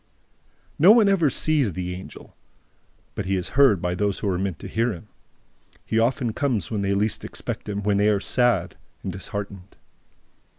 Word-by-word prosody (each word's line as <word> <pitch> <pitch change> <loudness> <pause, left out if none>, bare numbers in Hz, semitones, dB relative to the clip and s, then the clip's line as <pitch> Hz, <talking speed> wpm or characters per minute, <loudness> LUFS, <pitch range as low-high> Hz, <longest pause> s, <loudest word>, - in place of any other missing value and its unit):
No 175 +7 +8
one 220 -2 +6
ever 185 -7 +3
sees 140 - +1
the 90 0 -4
Angel; 90 +1 -11 0.8
but 95 - -5
he 95 - +1
is 90 -1 -2
heard 130 -9 +4
by 90 - 0
those 100 +1 -1
who 105 - -2
are 90 -1 -1
meant 95 -4 -2
to - - -9
hear 115 +2 0
him. 105 +2 -10 0.8
He 110 - 0
often 120 0 0
comes 120 -6 -1
when 105 -2 -1
they 100 0 0
least 105 +2 -1
expect - - -6
him, 100 0 -3
when 100 0 +1
they 105 +1 +3
are 105 -1 +2
sad 120 +4 +1 0.3
and 95 - -3
disheartened. 100 0 -7
105 Hz, 180 wpm, -24 LUFS, 95-120 Hz, 0.8 s, No